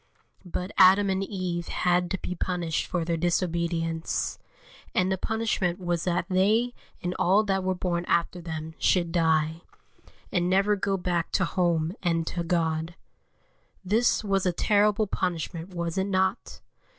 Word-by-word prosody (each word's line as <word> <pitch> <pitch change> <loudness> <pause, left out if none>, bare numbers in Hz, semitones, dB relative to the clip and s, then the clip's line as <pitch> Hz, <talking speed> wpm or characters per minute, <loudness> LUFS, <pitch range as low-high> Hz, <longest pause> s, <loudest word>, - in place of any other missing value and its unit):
But 180 +2 -4
Adam 195 +1 +6
and 190 +1 0
Eve 185 -3 -3
had 180 0 +1
to 190 - -1
be 180 - -5
punished 175 -2 -2
for 175 -2 -2
their 170 0 0
disobedience; 170 -1 -1 0.6
and 185 +1 +2
the 190 - +1
punishment 220 -6 -1
was 175 -2 -2
that 175 -1 0
they 210 +6 +2 0.3
and 180 0 -1
all 195 +4 +4
that 195 -2 0
were 185 0 0
born 175 -1 -2
after 170 +1 0
them 160 -1 -6
should 175 -3 +2
die, 160 -1 +1 0.7
and 175 -1 +1
never 195 +2 +3
go 195 0 -1
back 175 -2 -1
to 185 - +2
home 170 -2 0
and 165 -2 0
to 170 +1 -3
God. 165 -1 -1 0.9
This 220 +4 +2
was 195 -2 +1
a - - +3
terrible 210 +3 +2
punishment, 175 -2 -3
was 170 +1 -2
it 190 - +1
not? 190 +3 -1
180 Hz, 150 wpm, -27 LUFS, 170-190 Hz, 0.9 s, Adam